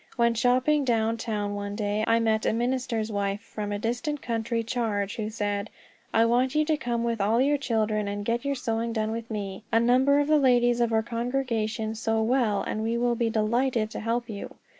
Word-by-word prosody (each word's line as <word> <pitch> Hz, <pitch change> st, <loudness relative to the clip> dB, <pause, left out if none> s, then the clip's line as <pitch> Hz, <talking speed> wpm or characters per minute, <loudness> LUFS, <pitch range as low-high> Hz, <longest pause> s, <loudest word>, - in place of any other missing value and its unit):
When 235 Hz, -1 st, +3 dB
shopping 255 Hz, +5 st, +2 dB
down 230 Hz, -2 st, +1 dB
town, 210 Hz, -3 st, -2 dB
one 205 Hz, 0 st, -4 dB
day, 210 Hz, 0 st, -1 dB
I 230 Hz, 0 st, +4 dB
met 220 Hz, -1 st, +1 dB
a -, -, +2 dB
minister's 240 Hz, -2 st, -1 dB
wife 200 Hz, -1 st, -1 dB
from 210 Hz, -2 st, -6 dB
a 205 Hz, -, -1 dB
distant 240 Hz, +7 st, -2 dB
country 230 Hz, -1 st, -2 dB
charge, 215 Hz, -3 st, -2 dB
who 215 Hz, -1 st, -2 dB
said: 205 Hz, -1 st, -2 dB, 0.4 s
"I 225 Hz, +1 st, +4 dB
want 250 Hz, +4 st, +2 dB
you 305 Hz, 0 st, +3 dB
to 310 Hz, 0 st, +2 dB
come 235 Hz, -4 st, -2 dB
with 230 Hz, -2 st, -1 dB
all 215 Hz, +4 st, +2 dB
your 285 Hz, +2 st, +3 dB
children, 215 Hz, -5 st, 0 dB
and 205 Hz, 0 st, -4 dB
get 235 Hz, +1 st, 0 dB
your 280 Hz, 0 st, -1 dB
sewing 230 Hz, -2 st, -2 dB
done 220 Hz, -1 st, -1 dB
with 230 Hz, 0 st, -5 dB
me. 200 Hz, -2 st, -5 dB
A 225 Hz, -, +4 dB
number 255 Hz, +4 st, +4 dB
of 290 Hz, -, +2 dB
the 305 Hz, 0 st, +4 dB
ladies 245 Hz, -2 st, +3 dB
of 235 Hz, -1 st, +2 dB
our 220 Hz, 0 st, +2 dB
congregation 230 Hz, -2 st, -2 dB
sew 225 Hz, 0 st, 0 dB
well, 230 Hz, -3 st, +1 dB
and 215 Hz, -, -3 dB
will 235 Hz, +2 st, +1 dB
be 235 Hz, -1 st, 0 dB
delighted 225 Hz, +1 st, +1 dB
to -, -, -5 dB
help 235 Hz, +2 st, -1 dB
you." 205 Hz, -4 st, -7 dB
230 Hz, 205 wpm, -26 LUFS, 215-245 Hz, 0.4 s, I